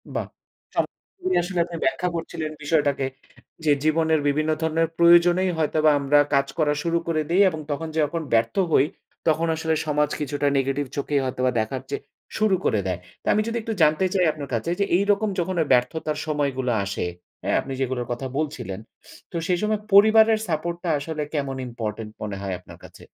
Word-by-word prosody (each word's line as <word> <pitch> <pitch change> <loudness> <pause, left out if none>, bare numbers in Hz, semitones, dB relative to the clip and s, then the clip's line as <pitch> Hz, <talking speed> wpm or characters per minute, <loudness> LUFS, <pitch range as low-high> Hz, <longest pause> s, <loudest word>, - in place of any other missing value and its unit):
বাহ! - - -2 0.5
চমৎকারই 370 -1 -2
আসলে 180 -1 -3
আপনি 170 -1 -7
ব্যাখ্যা 135 +7 +1
করছিলেন 165 -1 -4
বিষয়টাকে 145 -3 +1 0.6
যে 150 - +4
জীবনের 160 0 +2
বিভিন্ন 155 +2 +1
ধরনের 160 0 +1
প্রয়োজনেই 175 +2 +5
হয়তোবা 155 0 +3
আমরা 145 +1 +4
কাজ 140 0 +3
করা 150 -2 +2
শুরু 170 0 +1
করে 155 -2 +1
দেই, 185 +4 +4
এবং 160 -2 -6
তখন 160 +3 -3
যে - - +1
যখন 165 +3 -3
ব্যর্থ 115 0 +2 0.2
হই 135 - +5 0.4
তখন 160 +1 +2
আসলে 160 0 -1
সমাজ 150 -1 +1
কিছুটা 145 0 -1
নেগেটিভ 135 +1 0
চোখেই 140 0 0
হয়তোবা 130 0 0
দেখার 125 +4 -2
চেয়ে 140 - -3 0.4
শুরু 215 -3 +3
করে 105 - +2
দেয়। 90 -1 -2 0.2
তো - - -11
আমি 215 - +2
যদি 235 +1 -2
একটু 225 0 -3
জানতে 155 +4 +4
চাই 185 -3 +3
আপনার 145 -3 -8
কাছে, 115 +8 -1
যে 200 - +3
এইরকম 205 +2 +2
যখন 180 +1 -1 0.2
ব্যর্থতার 150 +5 +1
সময়গুলো 140 -4 0
আসে 100 -2 -3 0.4
হ্যাঁ - - +1
আপনি 135 - -6
যেগুলোর 130 -2 -2
কথা 130 +2 -3
বলছিলেন 125 -11 -3 0.5
তো - - -9
সেই 180 -1 +2
সময় 215 0 0
পরিবারের 220 +2 +7
সাপোর্ট 170 +1 -2
টা 175 - -1
আসলে 150 +1 -4
কেমন 140 -3 -2
ইম্পোর্টেন্ট 110 -2 -5
মনে 105 -2 -4
হয় 95 -2 -3
আপনার 90 - -14
কাছে? - - -15
155 Hz, 180 wpm, -24 LUFS, 135-170 Hz, 0.6 s, পরিবারের